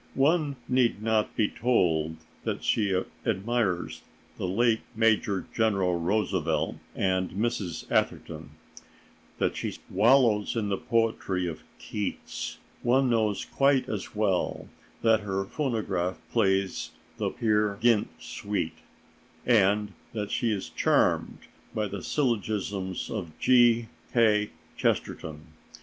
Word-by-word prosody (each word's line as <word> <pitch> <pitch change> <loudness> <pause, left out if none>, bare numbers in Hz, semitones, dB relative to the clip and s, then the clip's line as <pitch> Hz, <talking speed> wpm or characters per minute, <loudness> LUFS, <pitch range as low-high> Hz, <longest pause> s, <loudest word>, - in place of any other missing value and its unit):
One 145 +1 +2
need 125 -4 +2
not 110 -1 +1
be 110 - +3
told 80 -11 +1 0.3
that - - -3
she 95 -4 +2 0.2
admires 105 -3 -1 0.4
the - - -1
late 110 +4 +2 0.2
Major 110 -3 +2
General 95 -6 +2
Roosevelt 85 -4 0 0.2
and 95 -1 +1
Mrs. 105 -4 -2
Atherton, 80 -2 -1 0.9
that - - 0
she - - -3 0.2
wallows 115 -4 +4
in 110 -3 -1
the 100 - 0
poetry 115 -5 0
of 80 -3 -5 0.2
Keats. 105 -2 -4 0.2
One 130 +1 +3
knows 110 -3 +1
quite 135 -2 +2
as 110 -3 -5
well 100 -4 0 0.4
that 110 -1 +5
her 95 -2 -2
phonograph 100 - -1
plays 95 -4 +1 0.3
the - - 0
"Peer 105 -2 +1
Gynt" 115 -2 +3
suite, 80 -1 -4 0.7
and 105 -3 +3 0.2
that 105 -2 -3
she 120 - +1
is 100 -3 -3
charmed - - +2 0.4
by 105 -1 0
the 100 -1 -6
syllogisms 105 - -1
of 85 -8 -5
G. 120 -2 +5 0.3
K. 105 -3 +4 0.3
Chesterton. 75 -1 -2
105 Hz, 115 wpm, -28 LUFS, 95-115 Hz, 0.9 s, that